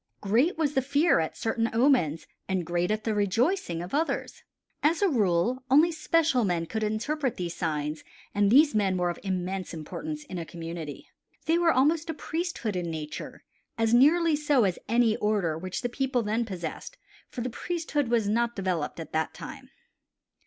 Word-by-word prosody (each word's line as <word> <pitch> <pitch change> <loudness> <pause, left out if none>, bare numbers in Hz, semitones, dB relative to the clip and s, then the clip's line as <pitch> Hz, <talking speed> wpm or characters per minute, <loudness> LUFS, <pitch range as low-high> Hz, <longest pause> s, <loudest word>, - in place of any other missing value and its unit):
Great 235 - +2
was 300 -3 0
the 265 - +2
fear 285 - +3
at 160 - -2
certain 225 0 0
omens, 230 - +3 0.2
and 185 -3 0
great 180 +6 0
the 220 - 0
rejoicing 205 - 0
at 180 - -9
others. 315 +3 -1 0.4
As 325 +6 +2
a - - +5
rule 225 - +1
only 305 +6 +5
special 315 -4 +2
men 175 -4 0
could 220 +6 -4
interpret 240 +6 -1
these 175 -2 -4
signs 150 -2 -2 0.3
and 205 -1 +3
these 290 +6 +6
men 195 -3 +1
were 175 -1 +1
of - - -9
immense 185 -1 -3
importance 300 - -6
in 185 -12 -6
a - - -3
community. 165 -2 -7 0.4
They 330 +2 +3
were 340 -1 +4
almost 310 +5 +2
a 320 - -2
priesthood 320 - -3
in 175 -2 -2
nature, 155 -2 -6 0.3
as 225 0 +2
nearly 315 +6 +5
so 290 -4 +2
as 190 -3 0
any 230 -1 +3
order 205 -7 0
which 185 +3 -5
the - - +1
people 255 0 -1
then 220 +3 0
possessed, 185 - -6 0.3
for 245 - -6
the 250 +1 -3
priesthood 320 -1 -2
was 230 -3 +1
not 235 +3 +1
developed 180 -5 -2
at 160 - -7
that 160 0 -1
time. - - -9
225 Hz, 175 wpm, -27 LUFS, 180-290 Hz, 0.4 s, these